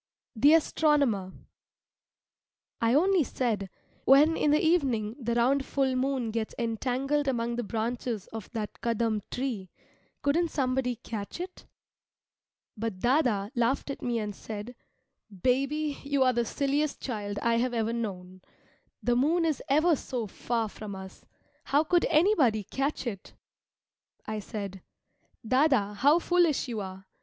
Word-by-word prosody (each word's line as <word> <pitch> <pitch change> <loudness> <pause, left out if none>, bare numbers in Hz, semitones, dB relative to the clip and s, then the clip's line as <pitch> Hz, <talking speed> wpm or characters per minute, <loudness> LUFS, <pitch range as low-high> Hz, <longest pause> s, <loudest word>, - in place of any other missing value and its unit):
THE 290 +8 +6
ASTRONOMER 285 - +2 1.5
I 230 +2 +3
only 365 +2 +4
said, 220 -7 -2 0.4
"When 295 +5 +6
in 300 - +1
the 300 +1 +4
evening 260 -10 +1
the 235 -2 -1
round 265 +4 +3
full 270 -1 0
moon 255 -3 0
gets 220 -1 -3
entangled 255 +5 -1
among 235 -2 0
the 240 - -2
branches 230 0 -3
of 220 -4 -7
that 215 -3 -5
Kadam 230 -2 0
tree, 240 -8 -3 0.5
couldn't 330 +5 +2
somebody 255 -3 0
catch 215 +4 -6
it?" 365 +1 -8 1.1
But 225 -2 -3
dâdâ 185 - -17
[elder 270 +6 +5
brother] 205 -4 -1
laughed 250 +3 0
at - - -7
me 240 -1 -1
and 210 -2 -3
said, 220 +2 -7 0.7
"Baby, 280 +4 +1
you 280 -1 +1
are 255 -1 +3
the 235 0 +1
silliest 280 +5 -1
child 205 -5 -4
I 235 0 +3
have 245 +1 0
ever 225 0 0
known. 185 -5 -5 0.6
The 245 - +2
moon 320 +7 +2
is 315 -3 0
ever 310 +4 +4
so 250 -4 -4
far 230 +2 -2
from 210 -1 -8
us, 190 0 -10 0.4
how 290 +2 +3
could 350 +2 +2
anybody 305 - +3
catch 275 +7 -2
it?" 200 -6 -6 0.9
I 215 0 -3
said, 200 -3 -6 0.7
"Dâdâ 255 -6 +2
how 285 +8 +5
foolish 345 -5 +2
you 230 -3 -3
are! 190 -1 -7
245 Hz, 145 wpm, -28 LUFS, 220-280 Hz, 1.5 s, THE